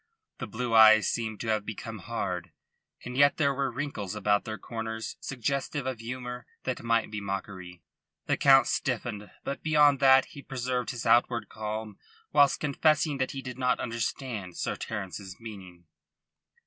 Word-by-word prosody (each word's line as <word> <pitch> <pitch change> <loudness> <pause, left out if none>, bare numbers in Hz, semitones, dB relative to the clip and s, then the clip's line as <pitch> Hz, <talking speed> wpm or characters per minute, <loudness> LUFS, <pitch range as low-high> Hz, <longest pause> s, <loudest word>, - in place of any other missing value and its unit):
The - - -4
blue 120 0 -3
eyes 110 -1 +8
seemed 110 -2 -2
to 115 - -3
have 110 -1 +1
become 110 +1 -6
hard, 90 -5 -4 0.5
and 125 - -6
yet 145 +2 +5
there 140 -3 +2
were 135 -1 -1
wrinkles 120 -7 -4
about 105 -1 +1
their 110 -2 -4
corners 110 -1 -5
suggestive 140 +2 -2
of 130 -3 -3
humour 125 +1 -6 0.2
that 130 - -3
might 115 -2 +1
be 105 -1 -4
mockery. 95 -3 -6 0.4
The - - +1
Count 135 -2 +6
stiffened; 115 -5 -2
but 140 - -4
beyond 150 -3 +4
that 135 -1 +6
he 140 - -10
preserved 125 -3 -3
his 120 - -5
outward 120 -2 +3
calm 110 -1 -5 0.3
whilst 145 -1 +5
confessing 150 0 +2
that 130 - 0
he 135 -1 -6
did 125 0 -7
not 125 -1 +2
understand 115 -4 -4
Sir - - -2
Terence's 95 -2 -6
meaning. 95 -6 -10
115 Hz, 160 wpm, -28 LUFS, 105-130 Hz, 0.5 s, eyes